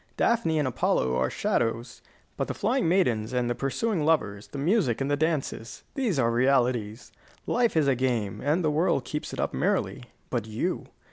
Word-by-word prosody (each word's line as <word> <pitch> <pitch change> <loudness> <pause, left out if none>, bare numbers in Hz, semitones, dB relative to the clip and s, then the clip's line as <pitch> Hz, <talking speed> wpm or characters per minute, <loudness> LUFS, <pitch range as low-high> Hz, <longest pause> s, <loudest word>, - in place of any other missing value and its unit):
Daphne 225 -9 +2
and 150 -3 +1
Apollo 65 - +1
are 65 0 +1
shadows. 115 0 -1 0.3
But - - -2
the - - -4
flying 235 -2 +1
maidens 125 - +1
and 125 -1 +1
the 120 - 0
pursuing 160 - -1
lovers, 110 -11 +1
the - - -8
music 155 - +1
and 135 +1 -1
the - - +4
dances, 145 -6 -2
these 240 - 0
are 115 -3 +2
realities. 120 -4 +1 0.3
Life 235 -7 +1
is 150 -3 +3
a 135 - +4
game, 120 -6 -1
and 155 +5 +1
the 155 - +2
world 160 +5 +1
keeps 150 - -4
it - - -6
up - - -1
merrily. 165 -7 -1 0.3
But 115 -4 -1
you? 110 0 -2
135 Hz, 185 wpm, -27 LUFS, 115-165 Hz, 0.3 s, the